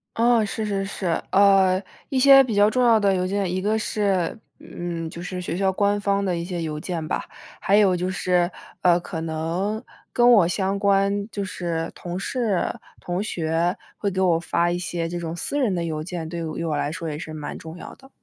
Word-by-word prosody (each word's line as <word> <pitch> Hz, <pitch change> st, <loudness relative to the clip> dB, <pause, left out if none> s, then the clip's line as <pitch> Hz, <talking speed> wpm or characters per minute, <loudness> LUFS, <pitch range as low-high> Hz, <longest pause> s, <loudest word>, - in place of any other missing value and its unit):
哦， 235 Hz, -1 st, +4 dB
是 215 Hz, +2 st, -3 dB
是 200 Hz, -2 st, -1 dB
是。 195 Hz, -1 st, -6 dB, 0.3 s
呃， 195 Hz, -1 st, +5 dB, 0.3 s
一 265 Hz, -, 0 dB
些 270 Hz, 0 st, +8 dB
比 230 Hz, -5 st, -3 dB
较 205 Hz, +1 st, +5 dB
重 250 Hz, +3 st, +1 dB
要 230 Hz, -2 st, +5 dB
的 200 Hz, -1 st, +3 dB
邮 180 Hz, 0 st, 0 dB
件。 195 Hz, -2 st, -1 dB
一 185 Hz, +1 st, -1 dB
个 215 Hz, +2 st, +1 dB
是， 200 Hz, -3 st, 0 dB, 0.2 s
嗯， 170 Hz, -2 st, -5 dB
就 170 Hz, -, -8 dB
是 180 Hz, 0 st, -5 dB
学 170 Hz, -1 st, -3 dB
校 190 Hz, 0 st, +2 dB
官 205 Hz, +1 st, +1 dB
方 200 Hz, 0 st, +1 dB
的 180 Hz, -2 st, 0 dB
一 170 Hz, -, -3 dB
些 175 Hz, -1 st, -4 dB
邮 155 Hz, -2 st, -3 dB
件 165 Hz, -2 st, -4 dB
吧。 -, -, -2 dB, 0.3 s
还 200 Hz, +2 st, +3 dB
有 195 Hz, -4 st, +4 dB
就 180 Hz, +1 st, -1 dB
是， 180 Hz, -1 st, +1 dB, 0.3 s
呃， 175 Hz, -1 st, +4 dB
可 165 Hz, -2 st, -6 dB
能 170 Hz, +8 st, -2 dB, 0.3 s
跟 240 Hz, 0 st, +4 dB
我 200 Hz, -8 st, +6 dB
相 195 Hz, +2 st, -1 dB
关， 200 Hz, 0 st, +2 dB
就 200 Hz, -2 st, -4 dB
是 170 Hz, -3 st, -3 dB
同 175 Hz, 0 st, -6 dB
事、 220 Hz, -4 st, 0 dB, 0.4 s
同 175 Hz, +2 st, -3 dB
学 170 Hz, -2 st, 0 dB, 0.2 s
会 200 Hz, -, -1 dB
给 190 Hz, 0 st, -3 dB
我 175 Hz, -3 st, +3 dB
发 170 Hz, 0 st, 0 dB
一 175 Hz, -, -1 dB
些 170 Hz, -2 st, -3 dB
这 175 Hz, +1 st, -4 dB
种 165 Hz, 0 st, -4 dB
私 290 Hz, -, -2 dB
人 230 Hz, -8 st, +1 dB
的 170 Hz, -, -1 dB
邮 155 Hz, -2 st, -3 dB
件， 170 Hz, -2 st, -5 dB
对 170 Hz, +1 st, -5 dB
于 160 Hz, -2 st, -4 dB
于 -, -, -2 dB
我 155 Hz, -3 st, -1 dB
来 145 Hz, +1 st, -1 dB
说 165 Hz, -1 st, -5 dB
也 150 Hz, 0 st, -5 dB
是 160 Hz, -, -7 dB
蛮 150 Hz, -1 st, -6 dB
重 160 Hz, +2 st, -9 dB
要 -, -, -9 dB
的。 270 Hz, 0 st, -18 dB
185 Hz, 235 characters per minute, -23 LUFS, 170-205 Hz, 0.4 s, 些